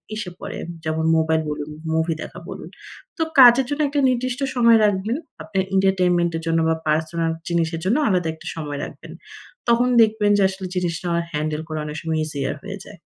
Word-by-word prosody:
এসে 210 Hz, -4 st, -4 dB
পড়ে। -, -, -6 dB, 0.3 s
যেমন 160 Hz, 0 st, -1 dB
মোবাইল 160 Hz, 0 st, +2 dB
বলুন, 150 Hz, 0 st, -4 dB, 0.2 s
মুভি 160 Hz, +1 st, +1 dB
দেখা -, -, -9 dB
বলুন। -, -, -8 dB, 0.5 s
তো 325 Hz, -, +1 dB, 0.2 s
কাজের 250 Hz, +1 st, +8 dB
জন্য 290 Hz, +1 st, -1 dB
একটা 285 Hz, 0 st, 0 dB
নির্দিষ্ট 255 Hz, +1 st, -1 dB, 0.2 s
সময় 235 Hz, -2 st, +6 dB
রাখবেন। 205 Hz, +4 st, 0 dB, 0.3 s
আপনার 195 Hz, -3 st, -1 dB
এন্টারটেইনমেন্ট 180 Hz, -3 st, +2 dB
এর -, -, -6 dB
জন্য 165 Hz, 0 st, +2 dB
বা 160 Hz, -, +2 dB
পার্সোনাল 160 Hz, +2 st, 0 dB, 0.2 s
জিনিসের 165 Hz, -1 st, 0 dB
জন্য 230 Hz, +9 st, +2 dB
আলাদা 180 Hz, -5 st, +1 dB
একটা 160 Hz, -, -12 dB
সময় 150 Hz, -3 st, -5 dB
রাখবেন। -, -, -9 dB, 0.6 s
তখন 235 Hz, +1 st, +4 dB
দেখবেন 215 Hz, -2 st, +3 dB
যে -, -, +2 dB
আসলে 190 Hz, 0 st, -7 dB
জিনিসটা 175 Hz, -1 st, -2 dB, 0.3 s
হ্যান্ডেল 155 Hz, +1 st, -2 dB
করা 155 Hz, -1 st, -4 dB
অনেক 150 Hz, +1 st, -6 dB
সময় 160 Hz, -1 st, -1 dB
ইজিয়ার 145 Hz, -2 st, -3 dB
হয়ে 200 Hz, 0 st, -6 dB
যায়। 195 Hz, -5 st, -13 dB
175 Hz, 180 wpm, -22 LUFS, 160-215 Hz, 0.6 s, কাজের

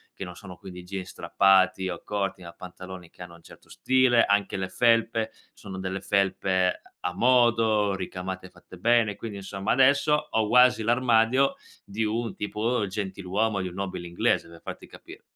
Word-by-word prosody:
che -, -, -7 dB
non 90 Hz, 0 st, -9 dB
sono 90 Hz, -2 st, -11 dB
quindi 90 Hz, -2 st, -10 dB
jeans 95 Hz, 0 st, -6 dB
strappati 95 Hz, -1 st, +2 dB
o 85 Hz, -, -6 dB
corti 100 Hz, -2 st, -3 dB
ma 85 Hz, 0 st, -10 dB
pantaloni 90 Hz, 0 st, -10 dB
che 90 Hz, -, -12 dB
hanno 85 Hz, -1 st, -12 dB
un 85 Hz, -, -18 dB
certo -, -, -17 dB
stile. 130 Hz, -2 st, +3 dB
Anche 100 Hz, 0 st, +1 dB
le 95 Hz, 0 st, -3 dB
felpe, 115 Hz, -1 st, +2 dB, 0.2 s
sono 95 Hz, -2 st, -9 dB
delle 95 Hz, 0 st, -4 dB
felpe 95 Hz, -2 st, 0 dB, 0.2 s
a 90 Hz, -, -3 dB
modo, 115 Hz, -5 st, +3 dB
ricamate 95 Hz, 0 st, -6 dB
fatte 90 Hz, 0 st, -16 dB
bene. 115 Hz, 0 st, +2 dB
Quindi, 105 Hz, -3 st, -7 dB
insomma, 95 Hz, +1 st, -4 dB
adesso 140 Hz, +3 st, +4 dB, 0.2 s
ho 110 Hz, -1 st, 0 dB
quasi 125 Hz, 0 st, +5 dB
l'armadio 120 Hz, +2 st, +3 dB, 0.3 s
di 105 Hz, +3 st, -3 dB
un 110 Hz, 0 st, -2 dB
tipo 110 Hz, +2 st, -1 dB
gentiluomo, 100 Hz, +1 st, -2 dB
di 95 Hz, -, -3 dB
un 90 Hz, -, -12 dB
nobile 95 Hz, -2 st, -5 dB
inglese, 85 Hz, 0 st, 0 dB
per 85 Hz, 0 st, -14 dB
farti -, -, -8 dB
capire. -, -, -14 dB
100 Hz, 170 wpm, -26 LUFS, 95-115 Hz, 0.3 s, quasi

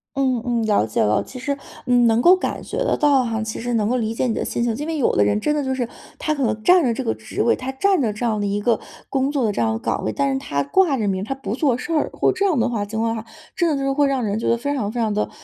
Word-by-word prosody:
嗯 260 Hz, -4 st, +1 dB
嗯， 240 Hz, -2 st, 0 dB
了 205 Hz, -, +2 dB
解 -, -, 0 dB
了。 105 Hz, 0 st, +2 dB
其 255 Hz, -, -11 dB
实， 280 Hz, +2 st, -2 dB, 0.3 s
嗯， 245 Hz, -2 st, +4 dB
能 225 Hz, +1 st, +3 dB
够 355 Hz, +8 st, +7 dB
感 370 Hz, -, -3 dB
觉 -, -, -6 dB
得 -, -, +1 dB
到 280 Hz, -3 st, +4 dB
哈， 225 Hz, -2 st, -2 dB
其 220 Hz, -, -5 dB
实 240 Hz, 0 st, -2 dB
能 215 Hz, -2 st, +1 dB
够 250 Hz, -, +1 dB
理 225 Hz, -2 st, -1 dB
解 245 Hz, -, -1 dB
你 235 Hz, -, 0 dB
的 -, -, -2 dB
心 235 Hz, -, -2 dB
情。 230 Hz, -2 st, 0 dB
因 295 Hz, +6 st, -5 dB
为 325 Hz, -, -2 dB
有 275 Hz, -, +1 dB
的 105 Hz, -, +4 dB
人 105 Hz, -, +1 dB
真 300 Hz, +7 st, 0 dB
的 290 Hz, -, 0 dB
就 265 Hz, 0 st, -1 dB
是， 245 Hz, -3 st, -2 dB, 0.3 s
他 310 Hz, -, -1 dB
可 280 Hz, -3 st, -2 dB
能 215 Hz, -2 st, -1 dB
占 360 Hz, -2 st, +6 dB
着 245 Hz, -, +2 dB
这 -, -, -3 dB
个 110 Hz, -, 0 dB
职 110 Hz, 0 st, -4 dB
位， 235 Hz, -, +3 dB
他 260 Hz, +1 st, -5 dB
占 375 Hz, +5 st, +2 dB
着 220 Hz, -4 st, +1 dB
这 215 Hz, +4 st, -4 dB
样 220 Hz, -3 st, 0 dB
的 205 Hz, -, 0 dB
一 200 Hz, +1 st, -1 dB
个 230 Hz, +3 st, +1 dB, 0.3 s
工 270 Hz, +1 st, 0 dB
作 270 Hz, -5 st, 0 dB
的 210 Hz, -, +1 dB
这 155 Hz, -, -2 dB
样 110 Hz, -1 st, +1 dB
岗 115 Hz, -, -2 dB
位， 110 Hz, -, -1 dB
但 140 Hz, +4 st, 0 dB
是 135 Hz, -, -1 dB
他 140 Hz, +1 st, -2 dB
挂 350 Hz, -, +2 dB
着 215 Hz, -4 st, -1 dB
名 190 Hz, 0 st, -1 dB
他 270 Hz, +5 st, -3 dB
不 220 Hz, -6 st, -5 dB
做 265 Hz, -4 st, +1 dB
事 330 Hz, -, -4 dB
儿， 305 Hz, -, +1 dB
或 -, -, +2 dB
这 390 Hz, +2 st, -1 dB
样 325 Hz, -10 st, +2 dB
的 230 Hz, -, +2 dB
话 215 Hz, -4 st, -2 dB
情 220 Hz, +2 st, -4 dB
况 225 Hz, 0 st, 0 dB
的 220 Hz, -, -4 dB
话， 225 Hz, -, -19 dB, 0.3 s
真 345 Hz, -3 st, +2 dB
的 300 Hz, -, +1 dB
就 275 Hz, -, -2 dB
是 275 Hz, -, +1 dB
会 285 Hz, 0 st, +2 dB
让 265 Hz, -3 st, 0 dB
人 205 Hz, +1 st, -1 dB
觉 -, -, -1 dB
得 235 Hz, -, +3 dB
非 285 Hz, +4 st, -2 dB
常 215 Hz, -7 st, -2 dB
非 240 Hz, -, -4 dB
常 220 Hz, -2 st, +1 dB
的， 210 Hz, -, -1 dB
235 Hz, 360 characters per minute, -21 LUFS, 215-275 Hz, 0.3 s, 够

